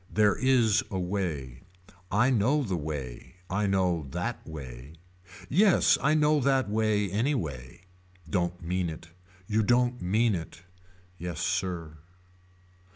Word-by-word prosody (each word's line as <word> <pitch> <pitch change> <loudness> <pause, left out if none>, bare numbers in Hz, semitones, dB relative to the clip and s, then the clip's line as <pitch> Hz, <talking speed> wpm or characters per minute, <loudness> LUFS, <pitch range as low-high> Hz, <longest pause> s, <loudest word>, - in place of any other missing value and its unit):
There 105 -1 +3
is 120 -5 +3
a 95 - -3
way. 85 -10 -3 0.5
I 125 +2 +3
know 130 +6 +2
the 95 -7 -2
way. 75 -2 -6 0.2
I 100 +2 +1
know 90 -6 +1
that 95 - -4
way. 70 -2 -9 0.5
Yes 190 - +4
I 150 +3 +3
know 150 0 +3
that 135 -2 +2
way 105 -2 +1
anyway. 90 - -2 0.5
Don't 90 +1 -2
mean 90 +1 -1
it. 80 +1 -9 0.4
You 110 +3 +1
don't 125 +2 +2
mean 110 +5 +2
it. 85 -1 -6 0.6
Yes 85 -2 -5
sir. 85 -3 -2
95 Hz, 125 wpm, -28 LUFS, 80-120 Hz, 0.6 s, Yes